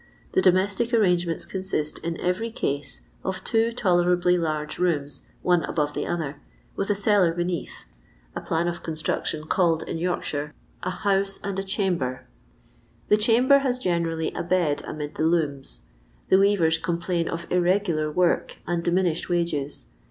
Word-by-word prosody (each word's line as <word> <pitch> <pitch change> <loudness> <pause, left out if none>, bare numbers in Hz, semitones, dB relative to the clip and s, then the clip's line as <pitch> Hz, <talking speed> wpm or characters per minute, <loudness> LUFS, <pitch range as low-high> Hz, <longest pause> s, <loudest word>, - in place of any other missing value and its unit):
The - - +3
domestic 200 +6 +3
arrangements 175 -6 +2
consist, 185 -6 -2
in 170 0 -4
every 180 +6 -1
case, 140 - -2 0.2
of 190 0 -3
two 225 0 +2
tolera 180 -6 +2
bly 180 0 +2
large 155 -3 -2
rooms, 150 -5 0 0.2
one 175 -1 +3
above 150 -2 -1
the - - -3
other, 155 -5 -3 0.3
with 200 - -2
a 205 - +3
cellar 200 -3 +3
braeath 175 -1 -3 0.2
— - - -32
a - - -3
plan 165 +1 0
of 175 0 -3
construction 155 -1 -2
called 165 0 +2
in 165 - -4
York 180 +1 -1
shire 145 0 -4 0.3
a 185 - -2
"house 195 +1 +1
and 195 -1 -2
a - - -2
chamber. 180 - -1 0.8
The 210 - +6
chamber 245 +6 +5
has 260 -2 0
generally 170 -7 -1
a - - -3
bed 170 -4 +1
amid 150 -1 -5
the - - -2
looms. 150 -5 0 0.5
The 190 - +6
weavers 180 -5 +3
complain 170 0 -1
of 170 0 -4
irregular 180 -4 +1
work 180 +2 +1
and 170 0 -1
diminished 175 -1 +1
wages. 165 -5 -1
175 Hz, 160 wpm, -25 LUFS, 160-190 Hz, 0.8 s, The